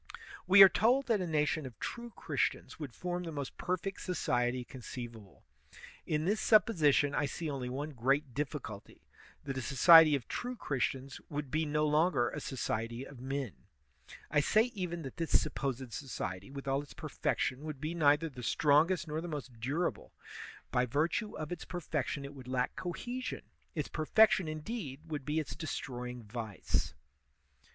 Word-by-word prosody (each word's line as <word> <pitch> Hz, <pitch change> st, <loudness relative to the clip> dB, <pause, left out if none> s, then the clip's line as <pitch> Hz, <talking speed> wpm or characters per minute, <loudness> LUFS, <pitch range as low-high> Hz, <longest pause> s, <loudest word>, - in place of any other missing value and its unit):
We 195 Hz, +1 st, +10 dB
are -, -, +12 dB
told 245 Hz, +8 st, +3 dB
that 220 Hz, -5 st, +2 dB
a 180 Hz, -, -2 dB
nation 150 Hz, -2 st, +1 dB
of 120 Hz, -, -12 dB
true 240 Hz, 0 st, -5 dB
Christians -, -, -2 dB
would 145 Hz, -6 st, -6 dB
form 180 Hz, 0 st, -3 dB
the 170 Hz, -2 st, -5 dB
most 140 Hz, -3 st, -5 dB
perfect 185 Hz, +2 st, -2 dB
society 125 Hz, -8 st, 0 dB
conceivable. 120 Hz, -5 st, -9 dB, 0.6 s
In 155 Hz, 0 st, 0 dB
this 210 Hz, +4 st, +1 dB
supix)sition 155 Hz, -10 st, +4 dB
I 145 Hz, -, +1 dB
see 155 Hz, +3 st, -4 dB
only 130 Hz, -3 st, -3 dB
one 145 Hz, +4 st, -4 dB
great 135 Hz, +1 st, +1 dB
diflBculty 135 Hz, -8 st, -5 dB, 0.2 s
— -, -, -24 dB
that 135 Hz, -2 st, -4 dB
a -, -, -3 dB
so 135 Hz, +2 st, -4 dB
ciety 165 Hz, +2 st, +9 dB
of 135 Hz, -, -4 dB
true 250 Hz, +1 st, -4 dB
Christians 135 Hz, -, -2 dB
would 145 Hz, -4 st, -4 dB
be 155 Hz, 0 st, +1 dB
no 150 Hz, +1 st, +1 dB
longer 150 Hz, -4 st, +3 dB
a -, -, -4 dB
society 115 Hz, -1 st, -3 dB
of 135 Hz, -4 st, -12 dB
men. 135 Hz, -4 st, -3 dB, 0.8 s
I 150 Hz, -, +4 dB
say 220 Hz, -, +3 dB
even 175 Hz, -5 st, -4 dB
that 135 Hz, -, -8 dB
this 165 Hz, -1 st, +3 dB
supposed 135 Hz, -4 st, -3 dB
society, 95 Hz, -8 st, -5 dB
with 140 Hz, 0 st, -8 dB
all 135 Hz, +1 st, +1 dB
its 145 Hz, -, -13 dB
per 155 Hz, -, -6 dB
fection, 130 Hz, -1 st, -1 dB
would 155 Hz, -3 st, -5 dB
be 155 Hz, +4 st, -3 dB
neither 150 Hz, -1 st, +4 dB
the 130 Hz, -5 st, -9 dB
strongest 155 Hz, +7 st, +3 dB
nor 155 Hz, +1 st, -2 dB
the 175 Hz, -, -5 dB
most 135 Hz, -7 st, -6 dB
durable; 145 Hz, +9 st, -2 dB, 0.6 s
by 125 Hz, 0 st, +2 dB
virtue 160 Hz, -, 0 dB
of 155 Hz, +1 st, -5 dB
its 175 Hz, -, -4 dB
perfection 150 Hz, -5 st, -3 dB
it 140 Hz, -, -8 dB
would 130 Hz, -3 st, -11 dB
lack 125 Hz, -1 st, -1 dB
cohe 185 Hz, +9 st, -4 dB
sion; 255 Hz, -, -5 dB, 0.3 s
its 150 Hz, -3 st, -1 dB
perfection, 190 Hz, +3 st, +4 dB
indeed, 155 Hz, -, -5 dB
would 150 Hz, -4 st, -5 dB
be 150 Hz, +3 st, 0 dB
its 155 Hz, -, -4 dB
destroying 125 Hz, -6 st, -5 dB
vice. 105 Hz, -, -3 dB
150 Hz, 175 wpm, -33 LUFS, 130-170 Hz, 0.8 s, are